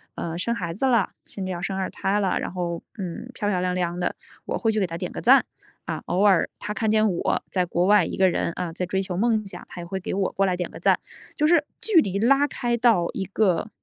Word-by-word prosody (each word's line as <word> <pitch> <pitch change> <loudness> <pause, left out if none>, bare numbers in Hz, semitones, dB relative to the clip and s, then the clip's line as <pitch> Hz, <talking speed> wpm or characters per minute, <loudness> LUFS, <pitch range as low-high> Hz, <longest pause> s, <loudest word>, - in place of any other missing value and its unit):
呃， 165 0 -4
生 235 +6 -1
孩 170 -6 -3
子 210 +10 -1
了， 235 -7 +3 0.2
甚 195 - -6
至 185 - -3
要 175 -1 -4
生 190 +1 -2
二 190 - -1
胎 200 +2 0
了， 190 -2 +1
然 - - -4
后， 170 -2 -3 0.2
嗯， 190 +4 -6
漂 205 -2 -2
漂 185 -3 +1
亮 180 0 0
亮 175 -1 -1
的， 175 - -1 0.3
我 - - -2
会 225 - +1
去 215 - 0
给 190 - +1
她 165 0 -5
点 - - -4
个 - - -6
赞。 - - +6 0.4
啊， - - -4
偶 180 - +1
尔 195 -4 +4
她 210 - -4
看 220 0 0
见 215 0 +4
我 175 - 0
在 185 -2 +1
国 175 +1 0
外 205 -1 +5
一 - - -5
个 190 -1 +5
人， 170 - -1
啊， 170 -2 -3
在 180 - -2
追 190 +2 -1
求 190 -2 -4
梦 215 +1 +1
想， - - -8
她 - - -9
也 170 - -6
会 190 +2 -4
给 - - -4
我 195 -1 0
过 195 - +2
来 185 -2 0
点 180 - -3
个 - - -10
赞。 - - +4 0.4
就 300 - +3
是 330 -2 +5 0.2
距 395 -7 +4
离 195 -4 -2
拉 275 +6 +4
开 240 -4 -1
到 230 -8 +3
一 195 - -2
个 195 -1 +1
190 Hz, 285 characters per minute, -24 LUFS, 180-220 Hz, 0.4 s, 赞